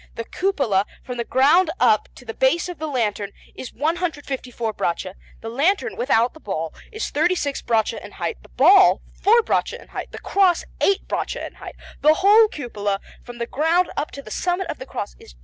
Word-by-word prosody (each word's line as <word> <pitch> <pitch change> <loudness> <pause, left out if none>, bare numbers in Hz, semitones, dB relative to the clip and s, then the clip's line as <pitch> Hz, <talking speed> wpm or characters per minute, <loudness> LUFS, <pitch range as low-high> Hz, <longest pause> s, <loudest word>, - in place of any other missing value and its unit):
The 230 - -5
cupola, 275 - 0 0.2
from 250 -1 -6
the 235 - -1
ground 295 +9 +4
up 215 - +3
to 250 - -14
the 225 - -5
base 290 +9 +2
of 355 -4 -7
the 315 - -3
lantern, 210 -7 -2 0.2
is 255 - -8
154 285 -7 -3
braccia; 185 0 -2 0.3
the 225 - -6
lantern, 310 - +1
without 250 - +2
the 315 - -14
ball, 165 - -4 0.2
is 435 0 -4
36 305 -2 0
braccia 225 -1 0
in 205 - -11
height; 170 -2 -4
the - - -18
ball, 370 +8 +6 0.2
4 455 +3 +5
braccia - - -1
in - - -16
height; - - -6
the - - -8
cross, 375 -4 +2 0.2
8 395 - +2
braccia - - -3
in - - -9
height. - - -10 0.3
The 305 +1 +6
whole 415 +5 +6
cupola, 205 - -3 0.2
from 245 -1 -10
the 235 - -2
ground 325 +8 +1
up 295 - -2
to 280 - -8
the 215 - -11
summit 360 - -1
of - - -9
the 260 - -8
cross, - - -5
is - - -15
202 - - -24
braccia. - - -28
275 Hz, 205 wpm, -22 LUFS, 225-355 Hz, 0.3 s, ball